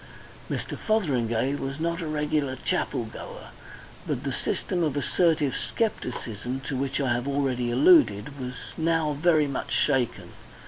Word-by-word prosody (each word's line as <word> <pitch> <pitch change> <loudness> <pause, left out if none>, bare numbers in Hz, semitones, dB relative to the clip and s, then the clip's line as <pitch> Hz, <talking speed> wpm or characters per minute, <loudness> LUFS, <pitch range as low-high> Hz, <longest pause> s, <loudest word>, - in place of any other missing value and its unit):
Mr. - - -3
Fotheringay 135 - +1
was 140 0 -4
not 170 +2 -1
a 165 - -3
regular 150 -3 0
chapelgoer, - - -3 0.6
but - - -2
the - - -2
system 180 - -1
of 150 -4 0
assertive 150 -1 +2
scepticism, 125 - -2
to 135 - -4
which 135 +2 -1
I 130 -3 +2
have 120 +2 -2
already 135 -3 0
alluded, 150 - +4
was 125 -1 -4 0.3
now 160 -2 +2
very 155 +1 +3
much 140 -2 -4
shaken. 130 -5 +1
140 Hz, 135 wpm, -26 LUFS, 130-160 Hz, 0.6 s, alluded